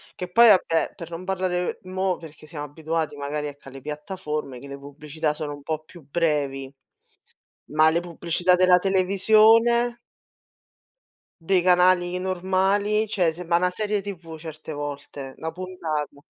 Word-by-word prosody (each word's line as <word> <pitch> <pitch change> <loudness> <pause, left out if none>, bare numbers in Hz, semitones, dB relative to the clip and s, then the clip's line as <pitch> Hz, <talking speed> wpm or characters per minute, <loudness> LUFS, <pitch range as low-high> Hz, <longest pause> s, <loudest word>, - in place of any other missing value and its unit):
Che 180 0 -6
poi 235 +4 +7
vabbè, 180 -5 +4
per 170 0 -9
non 170 +2 -6
parlare 185 -2 -1
mo, 185 0 -1
perché 155 -2 -13
siamo 150 -1 -6
abituati 160 +1 -3
magari 145 +1 -3
ecco 145 -1 -11
alle 135 0 -11
piattaforme, 150 -3 -5
che 140 - -11
le 140 0 -7
pubblicità 150 +2 -4
sono 150 -1 -5
un 145 - -10
po' 155 0 -3
più 170 +1 -15
brevi, 140 -4 -1 1.0
ma 155 +1 +5
le 170 +1 +1
pubblicità 175 +1 0
della 180 0 +6
televisione? 220 +5 +4 1.5
Dei 185 -2 +4
canali 180 0 +4 0.2
normali, 190 +3 +1 0.2
cioè 175 -5 +2
sembra 170 -1 +1
na 180 0 +2
serie 210 +1 -1
TV 190 -4 -7 0.2
certe 155 0 -8
volte, 145 -2 -6
na 160 0 -4
puntata. 160 -5 -4
170 Hz, 145 wpm, -24 LUFS, 150-185 Hz, 1.5 s, poi